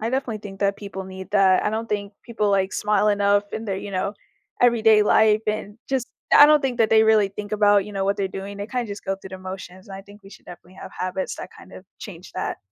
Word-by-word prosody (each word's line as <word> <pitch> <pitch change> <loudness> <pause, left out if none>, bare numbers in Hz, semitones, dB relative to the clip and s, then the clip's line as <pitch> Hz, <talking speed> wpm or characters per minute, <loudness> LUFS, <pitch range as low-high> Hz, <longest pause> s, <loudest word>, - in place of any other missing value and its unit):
I 225 +2 -2
definitely 260 -4 -2
think 200 -1 -11
that 200 0 +1
people 195 -2 -7
need 190 0 -10
that. 190 -2 +4
I 210 - +1
don't 225 +1 -4
think 205 -1 -3
people, 215 -3 -1
like, 190 -1 +1
smile 210 0 +1
enough 205 0 +2
in 220 - -5
their, 195 -3 -3
you 200 +1 -7
know, 195 +2 -2 0.5
everyday 220 -3 +5
life. 215 0 +4
And 210 -1 -3
just 265 -3 -1 0.3
I 290 - +9
don't 300 -1 +5
think 255 -3 -2
that 220 -2 +3
they 220 0 +6
really 220 -2 +4
think 205 +1 -8
about, 205 -2 +4
you 210 - -10
know, 195 -1 -2
what 200 +1 0
they're 195 -1 -1
doing. 195 +1 -7
They 205 - -5
kinda 245 -1 -3
just 205 0 -8
go 195 0 -2
through 190 -1 -12
the 190 - -8
motions, 185 +1 -9
and 195 - -8
I 195 - -10
think 205 +1 -17
we 195 - -14
should - - -16
definitely 175 +1 -14
have - - -10
habits 185 +1 -3
that - - -8
kind - - -15
of 185 - -12
change 180 -3 -11
that. - - -4
205 Hz, 260 wpm, -23 LUFS, 195-215 Hz, 0.5 s, I